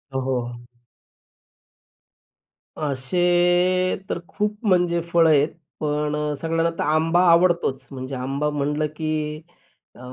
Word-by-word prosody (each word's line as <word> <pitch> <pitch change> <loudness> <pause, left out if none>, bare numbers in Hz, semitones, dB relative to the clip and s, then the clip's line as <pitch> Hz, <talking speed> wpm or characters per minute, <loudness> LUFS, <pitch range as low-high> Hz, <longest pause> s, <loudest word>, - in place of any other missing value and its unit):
हो, - - +1
हो. 125 -2 -2 2.3
असे 175 +5 +1
तर - - -2
खूप 210 0 -2
म्हणजे 175 -3 +2
फळं 165 -1 +5
आहेत 150 0 +4 0.3
पण 150 0 -1
अ, 150 0 -2
सगळ्यांना 165 0 +1
तर - - -1
आंबा 160 +3 +2
आवडतोच 170 -5 +3
म्हणजे 130 0 -6
आंबा 135 +4 -2
म्हटलं 150 +1 -1
की 155 -1 -3 0.5
अ, - - -16
155 Hz, 115 wpm, -23 LUFS, 145-175 Hz, 2.3 s, फळं